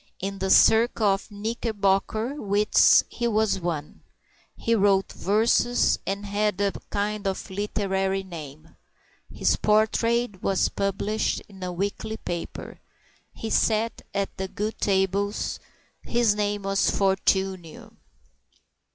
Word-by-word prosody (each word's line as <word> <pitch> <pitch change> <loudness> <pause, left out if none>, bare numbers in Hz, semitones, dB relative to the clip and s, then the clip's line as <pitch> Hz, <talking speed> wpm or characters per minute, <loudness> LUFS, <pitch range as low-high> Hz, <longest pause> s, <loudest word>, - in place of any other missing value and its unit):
In 195 +1 -4
the 190 - -1
circle 225 +2 +5
of 195 +1 +1
Knickerbocker 215 +1 -1
wits 205 +1 +4
he 240 - -3
was 215 -3 +1
one. 165 -4 -4 0.6
He 230 - 0
wrote 195 -3 +2
verses, 225 +4 +2
and 200 +1 -3
had 205 -1 -1
a 200 -1 +2 0.2
kind 205 0 -2
of 190 0 -4
literary 195 -1 -1
name. 155 -3 -10 0.6
His - - +1
portrait 220 0 +1
was 195 -1 +1
published 200 +2 -1
in 195 -2 -15
a 180 0 -3
weekly 200 +4 -3
paper. 175 -4 -6 0.5
He 225 - -6
sat 225 +1 +1
at 200 0 -3
the 190 0 -3
good 210 +3 -4
tables. 200 +1 0 0.4
His 235 -3 +2
name 205 -1 -2
was 195 0 +1
Fortunio. 190 -3 0
200 Hz, 115 wpm, -25 LUFS, 190-215 Hz, 0.6 s, circle